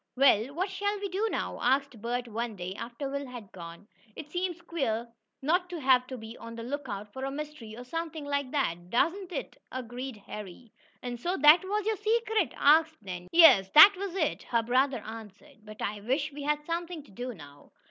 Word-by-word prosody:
"Well, 260 -1 +4
what 375 +3 -1
shall 405 +1 -1
we 400 0 -3
do 395 +5 0
now?" - - -3
asked 265 -2 +1
Bert 245 +1 -2
one 230 0 -4
day, 180 0 -5
after 235 +6 -6
Will 280 0 -4
had 240 -6 -10
gone. 170 +2 -10 0.3
"It 300 - -9
seems 355 0 -2
queer 270 -10 -2 0.4
not 355 +5 +1
to 350 -2 -5
have 255 -2 +4
to 260 - -6
be 220 0 -9
on 230 0 -9
the 230 - -6
lookout 230 -6 -5
for 265 - -6
a 270 - -1
mystery 280 -6 -7
or 245 - -7
something 320 +2 -5
like 285 -2 -1
that." 175 - -2
"Doesn't 350 - 0
it," - - -5
agreed 250 0 -6
Harry. 210 +2 -9 0.3
"And 245 -1 -5
so 355 +9 -1
that 300 +5 +7
was 410 +2 -2
your 440 -1 0
secret?" 435 -2 +1
asked 315 +2 +4
Nan. 180 -2 -7
"Yes, 320 - +7
that 350 +7 +11
was 385 -1 -5
it," 325 -6 0
her 230 -1 0
brother 255 0 +1
answered. 220 +4 -11
"But 215 0 -9
I 205 0 -3
wish 275 +7 -1
we 290 - -7
had 295 +1 -1
something 335 -1 -4
to 275 - -19
do 245 +4 -6
now." 145 -3 -14
270 Hz, 200 wpm, -29 LUFS, 230-330 Hz, 0.4 s, that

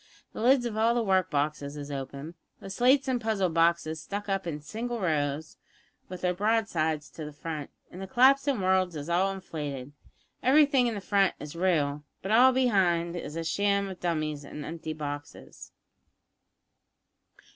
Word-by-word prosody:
The - - -6
lids 250 +1 +4
of 230 -3 -3
all 225 +2 +3
the 240 - +1
work 190 -3 +2
boxes 145 -1 -2
is 145 0 -7
open, 140 +3 -6 0.3
the 195 - -8
slates 260 +6 +3
and 250 -2 0
puzzle 215 -5 0
boxes 165 -1 +1
stuck 205 +1 -5
up 195 -2 -1
in 150 -3 -3
single 230 +9 -5
rows, 155 -4 -1 0.5
with 180 -1 -7
their 180 0 +1
broadsides 180 -7 0
to 160 - -8
the 150 - -6
front, 150 0 -6 0.2
and 180 - -9
the 195 - -5
collapsin' 270 +3 +4
worlds 185 -2 +2
is 150 +2 -6
all 185 +3 +2
inflated. 145 -8 -6 0.5
Everything 275 -1 +4
in 230 - -2
the 200 - -5
front 195 0 +2
is 150 +2 -8
real, 150 -5 +1 0.2
but 195 - -3
all 250 +4 +7
behind 185 -9 +2
is 165 -2 -6
sham 200 +3 +1
dummies 155 -4 -2
an' 145 +1 -8
empty 160 -1 -5
boxes." 145 -1 -8
180 Hz, 160 wpm, -28 LUFS, 155-220 Hz, 0.5 s, all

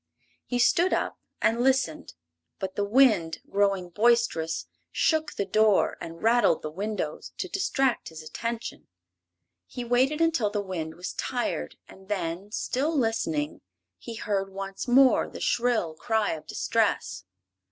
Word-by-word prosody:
He 245 - -1
stood 345 +9 +3
up - - -1 0.2
and 230 +2 +3
listened, 260 - +1 0.4
but 190 -1 -4
the 205 - 0
wind, 205 -8 +4
growing 195 -3 +1
boisterous, 215 -7 +2 0.3
shook 315 -2 +1
the 200 - -2
door 215 +1 +3
and 165 0 -8
rattled 230 -7 +3
the 155 - -4
windows 190 -3 -4
to 370 - -3
distract 270 -10 0
his 160 -1 -10
attention. 230 +9 -5 0.8
He 245 - -6
waited 260 +5 +2
until 325 -10 +2
the 205 0 -2
wind 175 -5 -4
was 180 +1 -6
tired 245 -1 -2
and 190 +1 -16
then, 185 0 -3
still 290 +8 -1
listening, 160 - -1 0.4
he 230 - -8
heard 200 -3 -1
once 195 +3 -6
more 260 +1 +5
the - - -9
shrill 235 -9 +1
cry 220 +5 0
of 155 - -6
distress. - - 0
210 Hz, 140 wpm, -27 LUFS, 180-245 Hz, 0.8 s, more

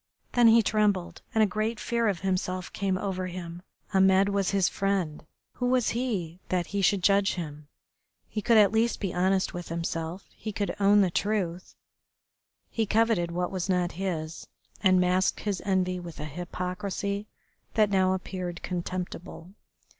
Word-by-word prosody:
Then 240 -1 +5
he 225 0 +7
trembled, 205 -5 +1
and 220 - +5
a - - +6
great 215 +3 -2
fear 235 -1 0
of 195 -4 -1
himself 185 -1 -2
came 190 -1 0
over 185 -1 -3
him. 175 -1 -7 0.3
Ahmed 190 +1 +5
was 200 -1 +1
his 195 -3 +2
friend. 195 -6 -1 0.3
Who 245 - 0
was 250 -2 +2
he 200 -9 -2
that 180 -2 +1
he 200 - +1
should 190 0 +2
judge 200 0 +3
him? 150 -4 -6 0.6
He 215 - -4
could 230 +2 +4
at 205 -2 +6
least 225 +2 +1
be 195 -4 -2
honest 190 +1 +1
with 175 -1 -6
himself, 165 +2 -4
he 215 - -5
could 205 0 -2
own 205 +1 +5
the 185 -3 +2
truth. 185 -3 -2 1.0
He 225 -2 0
coveted 220 -5 +2
what 180 +1 -2
was 190 0 -3
not 180 -2 +1
his, 165 -4 -4 0.3
and 185 -2 +5
masked 180 +1 +2
his 205 -3 -2
envy 185 -2 +1
with 170 -2 -9
a 150 - -4
hypocrisy 185 +5 -4 0.5
that 215 -2 +3
now 190 -1 +3
appeared 180 -2 -5
contemptible. 180 0 -5
190 Hz, 160 wpm, -28 LUFS, 180-205 Hz, 1.0 s, he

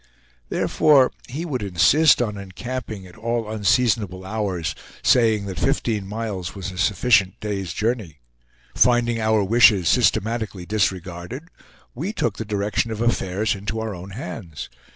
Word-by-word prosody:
Therefore, 140 -4 +4 0.2
he 150 +7 -4
would 135 -8 -3
insist 120 - +4
on 105 -3 -3
encamping 100 +1 -6
at 90 -1 -14
all 115 0 -2
unseasonable 105 -3 +1
hours, 95 -7 -2 0.3
saying 110 -4 +3
that 95 -2 -5
fifteen 115 -7 0
miles 105 -4 -4
was 95 -1 -5
a 90 - -8
sufficient 100 0 +2
day's 100 -4 -3
journey. 105 - -2 0.6
Finding 120 -1 +3
our 110 -1 +2
wishes 105 -3 +5
systematically 110 -4 +1
disregarded, 95 - -3 0.4
we 175 - -4
took - - -1
the 115 - -4
direction 105 +2 -1
of 110 -1 -4
affairs 110 -3 0
into 105 +3 -4
our 110 -1 -3
own 90 +1 -9
hands. 100 - -7
105 Hz, 135 wpm, -22 LUFS, 95-120 Hz, 0.6 s, wishes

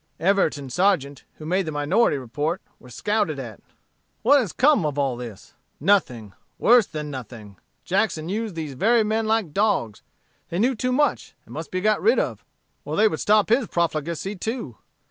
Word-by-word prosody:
Everett 195 -3 +2
and 135 -3 -8
Sargeant, 165 -7 +1
who 155 - -11
made 185 +2 0
the - - -2
minority 145 +5 +2
report, 145 +7 -3 0.2
were 125 - -15
scouted 205 - -1
at. 120 -6 -8 0.6
What 280 +5 +6
has 220 -10 -2
come 285 - +3
of 150 -2 -2
all 135 -3 0
this? 120 -5 -10 0.3
Nothing 125 - +1 0.2
worse 235 -3 +5
than 150 -2 -6
nothing. 115 -6 -9 0.3
Jackson 185 -5 0
used 210 0 -3
these 155 -4 -5
very 225 - +3
men 220 +1 -1
like 215 -8 0
dogs: 195 - 0 0.5
they 170 - -3
knew 245 +7 +2
too 250 +2 -2
much, 290 +2 0
and - - -13
must 160 +1 -6
be 185 - -2
got 215 +1 +2
rid 460 - +4
off, - - -2 0.4
or - - -4
they 220 - +5
would 160 -7 -2
stop 210 0 +3
his 235 0 +3
profligacy 170 +3 -2
too. 220 - -5
175 Hz, 180 wpm, -23 LUFS, 145-215 Hz, 0.6 s, What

